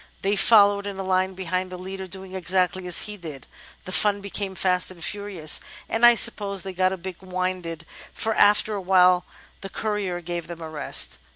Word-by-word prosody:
They 200 +1 +1
followed 205 -1 +4
in 200 -1 -6
a 195 - -4
line 185 0 0
behind 185 0 -3
the 180 - -7
leader, 190 +1 -7
doing 190 +1 -11
exactly 185 0 -1
as 175 - +3
he 210 -1 -5
did. 155 -8 -9 0.4
The 185 - -7
fun 205 +1 +2
became 200 -1 -4
fast 180 -1 +1
and 175 -3 -10
furious, 200 -7 0 0.3
and 225 - -2
I 240 0 +10
suppose 200 -5 +2
they 190 - -6
got 185 +1 +1
a 190 - -4
bit 185 0 -9
winded, 185 -3 -4 0.3
for 220 - -2
after 210 +1 +4
a 200 - -3
while 180 -1 +4 0.4
the 195 - -7
courier 205 -4 -3
gave 175 0 -5
them 170 -1 -8
a 160 - -7
rest. 155 - 0
185 Hz, 195 wpm, -24 LUFS, 180-200 Hz, 0.4 s, I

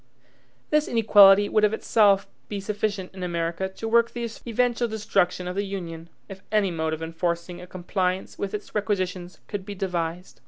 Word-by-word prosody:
This 300 0 +3
inequality 205 -3 +6
would 215 0 +2
of 210 0 +4
itself 200 -3 +3 0.2
be 205 - -3
sufficient 205 -1 -3
in 190 - -9
America 170 +1 -2
to 205 +4 -6
work 235 +1 +4
the 235 -1 -4 0.2
eventual 240 +1 +1
destruction 195 -4 0
of 180 - -4
the 200 - 0
Union, 170 -4 -6 0.2
if 195 -1 -10
any 210 -3 +2
mode 160 -1 -1
of 160 +1 -4
enforcing 170 +1 -3
a 180 - -10
compliance 185 +1 -2
with 200 +1 -3
its 210 - -8
requisitions 185 -4 -2
could 205 -2 -4
be 205 +1 -7
devised. 180 -2 -3
195 Hz, 170 wpm, -25 LUFS, 180-210 Hz, 0.2 s, inequality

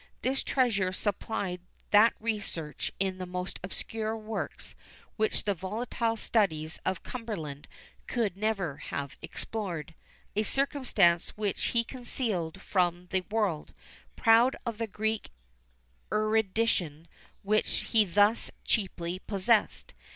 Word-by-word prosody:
This 265 +1 +1
treasure 210 -8 +2
supplied 195 -2 -2 0.3
that 215 +3 +7
research 205 -9 -3
in 190 -1 0
the 185 - -4
most 180 +1 -4
obscure 220 +4 -3
works, 220 0 -5 0.4
which 220 0 0
the 205 - +2
volatile 225 +5 -1
studies 160 -9 +1
of 185 -1 -1
Cumberland 170 - -5 0.4
could 220 -7 0
never 195 -8 -1
have 140 -2 -4
explored; 175 -8 -4 0.4
a 210 - +3
circumstance 220 - +3
which 210 -2 -1
he 235 -1 +2
concealed 215 -9 -2
from 180 -1 +1
the 190 -1 +2
world, 205 -8 0 0.4
proud 235 +2 +6
of 230 -2 -3
the 230 - 0
Greek 220 +1 -1 0.8
erudition 215 -6 +1 0.4
which 215 +2 +2
he 225 -2 +7
thus 205 +4 +3 0.2
cheaply 185 -4 -1
possessed. 205 +3 +1
205 Hz, 115 wpm, -30 LUFS, 180-225 Hz, 0.8 s, that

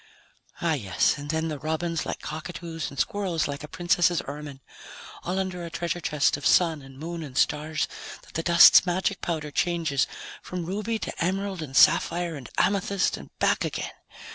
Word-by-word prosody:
Oh, 165 -2 +2
yes, 100 -10 +1
and 145 0 -7
then 160 +1 0
the 150 -3 -4
robins 160 +2 -2
like - - -4
cockatoos 165 +1 -5
and 140 - -12
squirrels 185 -4 0
like 145 +1 -5
a - - -6
princess's 175 +1 +2
ermine! 145 -1 -7 0.6
All 180 +2 -3
under 185 -2 -2
a 170 - -5
treasure 170 +1 -3
chest 150 -3 +1
of 145 - -11
Sun 160 0 +3
and 135 -1 -13
Moon 165 +3 -5
and 135 -4 -7
stars 150 +1 +1 0.4
that - - -18
the 165 - -1
dust's 170 0 +8
magic 185 +2 -1
powder 155 -3 -3
changes 160 -4 +1 0.3
from 180 -2 -5
ruby 210 +5 -2
to 215 - -4
emerald 190 0 -1
and 135 -4 -4
sapphire 170 0 +4
and 135 -5 -9
amethyst 200 0 +1
and - - -11
back - - +2
again. - - -3
165 Hz, 175 wpm, -26 LUFS, 150-175 Hz, 0.6 s, dust's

